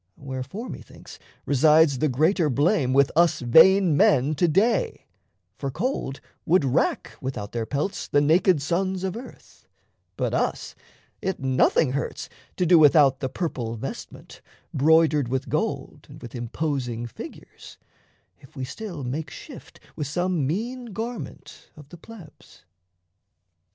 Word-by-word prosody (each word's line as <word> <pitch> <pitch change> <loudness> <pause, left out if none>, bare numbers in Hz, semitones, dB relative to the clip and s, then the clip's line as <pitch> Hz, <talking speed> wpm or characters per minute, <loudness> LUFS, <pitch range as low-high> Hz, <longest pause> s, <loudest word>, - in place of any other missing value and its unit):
Wherefore, 135 - -6
methinks, - - -11 0.3
resides 150 0 +4
the 155 - +1
greater 155 +5 +2
blame 145 - +1
With 140 +1 +3
us 170 +1 +3
vain 170 +7 +6
men 145 0 +3
to 175 +3 +1
day: 200 +7 +1 0.5
for 140 - -3
cold 140 - -3 0.2
would 165 -3 +2
rack, 125 -2 0
Without 125 -6 -5
their 115 -2 -3
pelts, 150 +8 -3
the 145 - +2
naked 160 +1 +3
sons 185 +5 -1
of 190 -1 -2
earth; 240 +3 -12 0.5
But - - -1
us - - -2 0.5
it 190 0 -3
nothing 130 +1 +2
hurts 140 +2 -4 0.3
to 180 - +1
do 170 0 +6
without 145 -3 +5
The 130 - -3
purple 125 -7 -4
vestment, 110 - -9 0.3
broidered 155 -1 +3
with 130 +2 -3
gold - - -3
And - - -12
with 120 -2 -10
imposing 120 -1 -3
figures, 120 - -11 0.6
if 135 -1 -19
we 130 -2 -4
still 175 0 -7
Make 140 +4 -4
shift - - -12 0.2
with 150 - -4
some 175 -2 -1
mean 240 - -3
garment 230 +3 -7
of 150 -2 -14
the 175 - -12
Plebs. 180 - -15
150 Hz, 135 wpm, -24 LUFS, 130-180 Hz, 0.6 s, vain